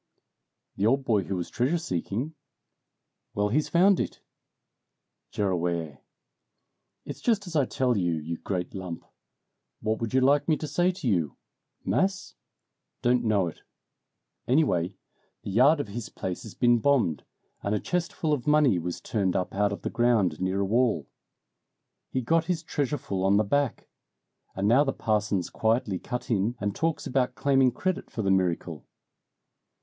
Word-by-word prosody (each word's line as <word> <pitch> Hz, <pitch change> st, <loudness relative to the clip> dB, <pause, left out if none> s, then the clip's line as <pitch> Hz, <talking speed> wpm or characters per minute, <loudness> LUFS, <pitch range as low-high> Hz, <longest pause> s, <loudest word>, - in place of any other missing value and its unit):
"The 100 Hz, +2 st, +2 dB
old 135 Hz, +3 st, +2 dB
boy 105 Hz, -6 st, +2 dB
who 95 Hz, -, -3 dB
was 90 Hz, -1 st, -4 dB
treasure 130 Hz, +8 st, +1 dB
seeking?" 120 Hz, -, -3 dB, 1.0 s
"Well, 105 Hz, 0 st, +1 dB
he's 150 Hz, +7 st, +1 dB
found 185 Hz, +3 st, +4 dB
it!" -, -, -3 dB, 1.1 s
"Gerraway!" 85 Hz, -6 st, -1 dB, 1.0 s
"It's -, -, -7 dB
just 215 Hz, -4 st, +1 dB
as 175 Hz, -3 st, -8 dB
I 145 Hz, -3 st, +4 dB
tell 125 Hz, -2 st, +1 dB
you, 90 Hz, -4 st, +1 dB
you 80 Hz, +2 st, -4 dB
great 90 Hz, -1 st, -4 dB
lump! 90 Hz, -3 st, -6 dB, 0.7 s
What 110 Hz, +1 st, -1 dB
would 115 Hz, +2 st, -2 dB
you 130 Hz, -, +5 dB
like 140 Hz, +2 st, +3 dB
me 155 Hz, -2 st, +3 dB
to -, -, -5 dB
say 175 Hz, +5 st, +1 dB
to 180 Hz, -6 st, -6 dB
you? 85 Hz, -, 0 dB, 0.5 s
Mass? 190 Hz, 0 st, 0 dB, 0.7 s
Don't 125 Hz, 0 st, +3 dB
know 105 Hz, -4 st, +2 dB
it. 85 Hz, -, -7 dB, 0.9 s
Anyway, 100 Hz, -, +2 dB, 0.5 s
the -, -, -5 dB
yard 135 Hz, +9 st, +5 dB
of 130 Hz, -, -3 dB
his 110 Hz, +2 st, -6 dB
place 90 Hz, -1 st, -5 dB
has 110 Hz, -, -10 dB
been 120 Hz, -1 st, +4 dB
bombed, 125 Hz, -, +2 dB, 0.4 s
and 100 Hz, +1 st, 0 dB
a -, -, 0 dB
chest 180 Hz, -1 st, -2 dB
full 155 Hz, -2 st, -1 dB
of 135 Hz, -3 st, -2 dB
money 150 Hz, -10 st, +4 dB
was 85 Hz, +1 st, -4 dB
turned 100 Hz, -5 st, -1 dB
up 90 Hz, -, -1 dB
out 100 Hz, +1 st, +1 dB
of 100 Hz, -, -6 dB
the -, -, -2 dB
ground 110 Hz, -10 st, +2 dB
near 95 Hz, +1 st, 0 dB
a -, -, +1 dB
wall. 110 Hz, -, +1 dB, 1.0 s
He 130 Hz, -, -1 dB
got 165 Hz, +6 st, +2 dB
his 175 Hz, -2 st, -1 dB
treasure 145 Hz, -2 st, -1 dB
full 100 Hz, -9 st, -3 dB
on 100 Hz, +1 st, +4 dB
the 105 Hz, -, +4 dB
back. 140 Hz, +4 st, 0 dB, 0.7 s
And 95 Hz, +1 st, 0 dB
now 125 Hz, +6 st, +5 dB
the 135 Hz, -, -1 dB
parson's 105 Hz, -4 st, 0 dB
quietly 110 Hz, -4 st, 0 dB
cut 125 Hz, +1 st, -5 dB
in 110 Hz, +3 st, +1 dB
and 100 Hz, -1 st, -2 dB
talks 160 Hz, -3 st, -1 dB
about 125 Hz, -1 st, 0 dB
claiming 135 Hz, +1 st, +3 dB
credit 185 Hz, +9 st, -2 dB
for 110 Hz, -, -4 dB
the 95 Hz, -, +2 dB
miracle." 85 Hz, -5 st, -1 dB
115 Hz, 165 wpm, -27 LUFS, 95-140 Hz, 1.1 s, you